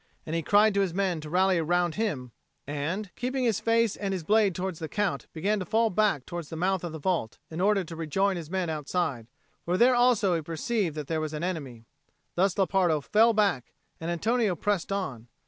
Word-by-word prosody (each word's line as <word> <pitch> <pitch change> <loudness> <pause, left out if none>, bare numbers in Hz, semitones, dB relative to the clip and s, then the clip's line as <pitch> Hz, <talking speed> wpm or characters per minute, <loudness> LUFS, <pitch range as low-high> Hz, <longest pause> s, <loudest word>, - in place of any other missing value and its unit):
And 160 - -3
he 165 - 0
cried 205 +5 +4
to 200 - +2
his 180 -3 -1
men 185 -5 0
to 150 - -8
rally 185 +1 +3
round 175 +1 +1
him, 150 - -2 0.3
and, 165 +8 -3
keeping 255 +1 -2
his 225 -5 +1
face 230 -2 +2
and 195 -2 -3
his 180 - -5
blade 205 0 +3
towards 185 -3 -3
the 160 - -5
Count, 205 -3 -1
began 200 +6 0
to - - -2
fall 225 +4 +2
back 190 -9 +1
towards 170 -3 -6
the - - -6
mouth 185 +2 0
of 170 - -4
the 160 - -6
vault, 160 -7 -1
in 160 +2 -4
order 200 0 +3
to 165 -1 -9
rejoin 190 +5 0
his 165 -3 -6
men 185 -1 -1
outside; 150 -6 -2 0.4
for 175 +2 0
there 245 +4 +5
also 240 -6 +3
he 165 - 0
perceived 165 +3 -2
that 150 -1 -4
there 160 +2 -2
was 155 0 -4
an 150 - -4
enemy. 140 -11 -4 0.5
Thus 185 +1 +1
Lepardo 185 -5 +2
fell 220 +10 +4
back, 200 - +1 0.3
and 165 - -4
Antonio 215 +3 +1
pressed 200 +2 -1
on. 135 - -3
180 Hz, 215 wpm, -27 LUFS, 160-205 Hz, 0.5 s, there